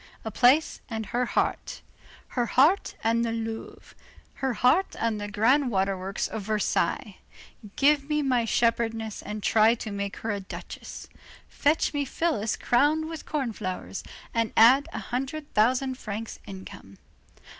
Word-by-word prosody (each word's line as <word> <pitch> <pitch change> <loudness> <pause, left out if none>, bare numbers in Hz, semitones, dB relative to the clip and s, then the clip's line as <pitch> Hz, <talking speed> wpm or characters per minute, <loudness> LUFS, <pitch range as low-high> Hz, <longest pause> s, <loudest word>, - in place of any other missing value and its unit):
A 220 - -3
palace 255 +8 +3
and 220 -2 -4
her 245 +3 -1
heart. - - -1 0.5
Her 240 -2 -1
heart 300 - +3
and 230 +1 +2
the 230 - -1
Louvre. 225 0 -6 0.4
Her 265 -2 -2
heart 275 - +3
and 225 -2 -1
the 205 - -3
grand 245 +7 +3
waterworks 195 -1 -1
of 220 - -5
Versailles. 210 +1 -1 0.6
Give 285 0 +3
me 300 -1 +1
my 250 -4 +2
shepherdess 225 -1 0
and 210 0 -6
try 220 +1 +4
to 220 -2 -6
make 200 0 -4
her 225 - 0
a 205 - -2
duchess. 190 - -9 0.4
Fetch 300 +2 +1
me 290 -1 0
Phyllis 275 -6 -1
crowned 300 +6 +2
with 325 -2 -8
corn 270 -7 -2
flowers, 185 0 -5 0.3
and 230 -1 0
add 265 +7 +6
a - - -6
hundred 275 +4 -4
thousand 255 +4 +2
francs 215 +1 -6
income. 190 - -10
230 Hz, 145 wpm, -27 LUFS, 215-275 Hz, 0.6 s, add